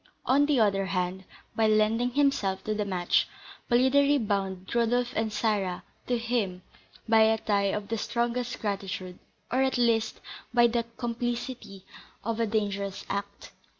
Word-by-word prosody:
On 285 Hz, +3 st, +4 dB
the 290 Hz, -4 st, +3 dB
other 195 Hz, -3 st, +2 dB
hand, 185 Hz, 0 st, -2 dB, 0.3 s
by 220 Hz, -1 st, +3 dB
lending 215 Hz, +3 st, +3 dB
himself 245 Hz, -8 st, +1 dB
to 215 Hz, -, -1 dB
this 210 Hz, -1 st, -2 dB
match, 180 Hz, -2 st, +1 dB, 0.4 s
Polidori 280 Hz, +4 st, +4 dB
bound 195 Hz, -5 st, -2 dB
Rodolph 240 Hz, +1 st, +1 dB
and 220 Hz, 0 st, 0 dB
Sarah 205 Hz, -5 st, -1 dB, 0.2 s
to 245 Hz, -, +1 dB
him 225 Hz, -6 st, -2 dB, 0.4 s
by 225 Hz, 0 st, +5 dB
a 220 Hz, 0 st, +5 dB
tie 205 Hz, -2 st, +1 dB
of 205 Hz, 0 st, -3 dB
the 225 Hz, -1 st, -1 dB
strongest 240 Hz, +2 st, -2 dB
gratitude, 190 Hz, -3 st, -4 dB, 0.3 s
or, 255 Hz, -, +2 dB
at 265 Hz, -1 st, +1 dB
least, 230 Hz, -2 st, +1 dB, 0.4 s
by 240 Hz, -1 st, +6 dB
the 235 Hz, 0 st, +1 dB
complicity 240 Hz, -4 st, -4 dB, 0.4 s
of 230 Hz, +1 st, -2 dB
a 230 Hz, -, +1 dB
dangerous 200 Hz, -2 st, -2 dB
act. 200 Hz, 0 st, -5 dB
220 Hz, 150 wpm, -28 LUFS, 200-240 Hz, 0.4 s, by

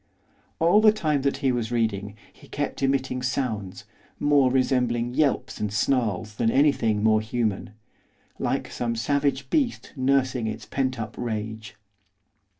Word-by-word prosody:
All 175 Hz, +6 st, +4 dB
the 215 Hz, -1 st, +7 dB
time 155 Hz, -9 st, 0 dB
that 140 Hz, 0 st, 0 dB
he 130 Hz, -, +4 dB
was 120 Hz, -2 st, -2 dB
reading 105 Hz, -3 st, -1 dB, 0.2 s
he -, -, -18 dB
kept -, -, -4 dB
emitting 135 Hz, -1 st, 0 dB
sounds, 120 Hz, -7 st, -3 dB, 0.4 s
more 145 Hz, -3 st, +4 dB
resembling 125 Hz, -2 st, +1 dB
yelps 145 Hz, -1 st, 0 dB
and 105 Hz, -1 st, -2 dB
snarls 110 Hz, -2 st, 0 dB
than 115 Hz, -, +2 dB
anything 115 Hz, -6 st, +2 dB
more 110 Hz, -1 st, +4 dB
human, 110 Hz, -1 st, -2 dB, 0.7 s
like -, -, -2 dB
some 120 Hz, -1 st, -2 dB
savage 140 Hz, +5 st, 0 dB
beast 280 Hz, -7 st, 0 dB
nursing 130 Hz, -3 st, +1 dB
its 110 Hz, -, -5 dB
pent 130 Hz, -3 st, -2 dB
up 110 Hz, 0 st, -5 dB
rage. 110 Hz, -2 st, -4 dB
125 Hz, 140 wpm, -25 LUFS, 110-140 Hz, 0.7 s, the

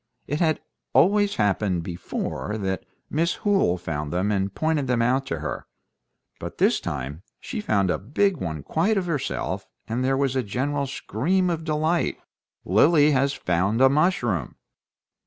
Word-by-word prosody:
It 145 Hz, +2 st, -2 dB
had 160 Hz, -3 st, +2 dB, 0.3 s
always 205 Hz, +2 st, +4 dB
happened 95 Hz, -4 st, +1 dB
before 90 Hz, +4 st, -4 dB
that 95 Hz, -3 st, -3 dB, 0.2 s
Miss 165 Hz, +3 st, 0 dB
Hoole 195 Hz, -, +3 dB
found 75 Hz, -4 st, -4 dB
them 95 Hz, +4 st, 0 dB
and 100 Hz, -1 st, 0 dB
pointed 155 Hz, +2 st, 0 dB
them 120 Hz, -2 st, +2 dB
out 130 Hz, +3 st, +1 dB
to -, -, -3 dB
her; -, -, -4 dB, 0.7 s
but -, -, -7 dB
this -, -, +3 dB
time 70 Hz, +5 st, -5 dB, 0.2 s
she 230 Hz, -5 st, -5 dB
found 100 Hz, -, +1 dB
a -, -, -1 dB
big 180 Hz, -, +1 dB
one 80 Hz, -, -4 dB
quite 195 Hz, -, +1 dB
of 190 Hz, -, 0 dB
herself, 160 Hz, -6 st, -2 dB, 0.2 s
and 120 Hz, +3 st, -1 dB
there 135 Hz, +1 st, +2 dB
was 135 Hz, -1 st, +1 dB
a 130 Hz, -, +2 dB
general 140 Hz, +6 st, -1 dB
scream 175 Hz, -, 0 dB
of 165 Hz, -1 st, -3 dB
delight, 155 Hz, +2 st, 0 dB, 0.5 s
"Lily 145 Hz, -, +5 dB
has 140 Hz, 0 st, +2 dB
found 95 Hz, +4 st, 0 dB
a 135 Hz, 0 st, +7 dB
mushroom!" 135 Hz, -, +1 dB
130 Hz, 155 wpm, -24 LUFS, 95-160 Hz, 0.7 s, a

